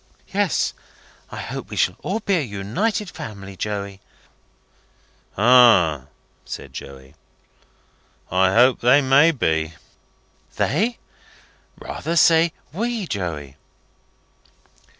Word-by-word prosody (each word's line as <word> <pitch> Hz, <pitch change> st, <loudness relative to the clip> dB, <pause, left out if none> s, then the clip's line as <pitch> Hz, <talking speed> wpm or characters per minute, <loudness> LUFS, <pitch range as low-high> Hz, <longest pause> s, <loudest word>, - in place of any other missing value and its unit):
"Yes. -, -, 0 dB, 0.6 s
I -, -, -9 dB
hope -, -, -6 dB
we -, -, -7 dB
shall -, -, +1 dB
all 225 Hz, -, -3 dB
be 200 Hz, -3 st, +1 dB
an 130 Hz, -, -6 dB
united 175 Hz, -, -2 dB
family, 100 Hz, -3 st, -9 dB
Joey." 100 Hz, -1 st, -5 dB, 1.4 s
"Ah!" 100 Hz, -, +5 dB, 0.4 s
said -, -, -9 dB
Joey. 65 Hz, -1 st, -10 dB, 1.2 s
"I 95 Hz, +1 st, +3 dB
hope 125 Hz, +5 st, +4 dB
they 130 Hz, +4 st, +5 dB
may 135 Hz, +4 st, +5 dB
be." 80 Hz, -, -1 dB, 0.8 s
"They? 235 Hz, +3 st, 0 dB, 0.8 s
Rather 165 Hz, -, -5 dB
say 165 Hz, 0 st, +5 dB, 0.2 s
we, 230 Hz, +2 st, -2 dB
Joey." 75 Hz, -, -5 dB
110 Hz, 95 wpm, -21 LUFS, -, 1.4 s, Ah